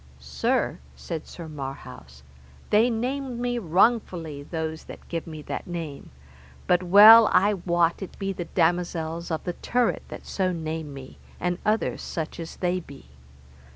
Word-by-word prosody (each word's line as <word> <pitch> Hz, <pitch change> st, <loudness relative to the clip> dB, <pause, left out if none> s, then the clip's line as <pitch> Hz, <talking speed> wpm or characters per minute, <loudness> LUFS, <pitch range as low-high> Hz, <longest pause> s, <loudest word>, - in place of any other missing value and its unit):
Sir, 65 Hz, 0 st, -1 dB, 0.2 s
said 150 Hz, -, -6 dB
Sir 170 Hz, -2 st, -9 dB
Marhaus, 135 Hz, -, -9 dB, 0.5 s
they 220 Hz, +4 st, +5 dB
name 250 Hz, +2 st, -3 dB
me 245 Hz, 0 st, -1 dB
wrongfully 180 Hz, -5 st, +1 dB
those 160 Hz, +1 st, -5 dB
that -, -, -12 dB
give 165 Hz, -1 st, -4 dB
me 155 Hz, -2 st, -8 dB
that -, -, -5 dB
name, 165 Hz, -5 st, -6 dB, 0.6 s
but 180 Hz, 0 st, +3 dB
well 210 Hz, +5 st, +9 dB
I 200 Hz, +3 st, +4 dB
wot 175 Hz, -2 st, +1 dB
it 190 Hz, -, -8 dB
be 195 Hz, -1 st, -2 dB
the 175 Hz, -2 st, -5 dB
damosels 170 Hz, -1 st, -1 dB
of 160 Hz, -2 st, -2 dB
the 175 Hz, -, -3 dB
turret 245 Hz, +6 st, 0 dB
that -, -, -9 dB
so 185 Hz, -2 st, -1 dB
name 160 Hz, -2 st, -4 dB
me, 135 Hz, -1 st, -11 dB, 0.2 s
and 180 Hz, +1 st, -1 dB
other 215 Hz, +1 st, 0 dB
such 160 Hz, 0 st, -5 dB
as 165 Hz, -1 st, -7 dB
they 180 Hz, 0 st, -1 dB
be. 140 Hz, -, -13 dB
175 Hz, 155 wpm, -25 LUFS, 160-200 Hz, 0.6 s, well